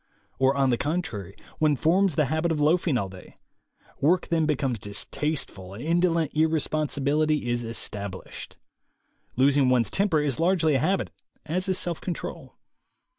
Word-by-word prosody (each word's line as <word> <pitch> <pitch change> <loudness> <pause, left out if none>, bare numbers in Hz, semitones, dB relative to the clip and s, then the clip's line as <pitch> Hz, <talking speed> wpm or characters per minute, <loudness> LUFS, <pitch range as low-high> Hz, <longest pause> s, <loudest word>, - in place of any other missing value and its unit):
Or, 135 +1 +3
on 135 -2 +3
the 120 - 0
contrary, 130 - -3 0.2
one 155 -2 +3
forms 175 +5 +2
the 150 - +3
habit 160 +5 0
of 155 - -1
loafing 155 -1 +2
all 100 - -1
day. 95 -1 -13 0.6
Work 175 +5 +2
then 165 -3 +1
becomes 135 -6 0
distasteful 100 -2 -3
and 115 - -8
indolent 165 -1 +1
irresponsibility 155 -2 +1
is 120 0 -1
established. 100 -4 -4 0.8
Losing 135 +1 +3
one's 125 -2 +2
temper 190 -5 +2
is 145 -5 -1
largely 165 -2 +2
a 135 - +3
habit, 190 +9 0 0.3
as 185 +5 -1
is 185 - +3
self 170 -2 -1
control. 180 - -6
150 Hz, 145 wpm, -26 LUFS, 125-165 Hz, 0.8 s, Or